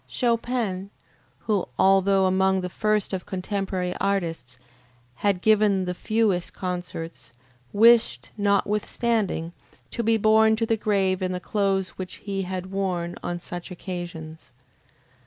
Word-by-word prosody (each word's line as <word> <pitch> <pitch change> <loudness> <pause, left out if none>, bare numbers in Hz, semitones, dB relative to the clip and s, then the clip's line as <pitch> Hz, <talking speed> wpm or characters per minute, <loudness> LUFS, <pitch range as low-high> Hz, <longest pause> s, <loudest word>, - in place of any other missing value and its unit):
Chopin, 230 -5 -1 0.5
who, 210 -4 0
although 195 0 +4
among 190 0 +2
the 180 0 -5
first 215 0 0
of 185 -2 -4
contemporary 190 -1 -2
artists, 165 -11 -2 0.6
had 195 0 0
given 210 -3 +4
the 180 - -2
fewest 205 -2 0
concerts, 175 -7 -5 0.4
wished, 210 - +4
notwithstanding, 205 -2 0 0.4
to - - -2
be 225 0 +3
borne 220 +1 +5
to 225 +1 0
the 225 - +1
grave 195 -3 +1
in 185 0 -1
the 180 - -3
clothes 195 -1 0
which 185 -1 -5
he 195 -1 -4
had 185 0 -5
worn 180 -3 -2
on 175 - -3
such 175 0 -7
occasions. 175 -3 -7
190 Hz, 125 wpm, -25 LUFS, 180-210 Hz, 0.6 s, borne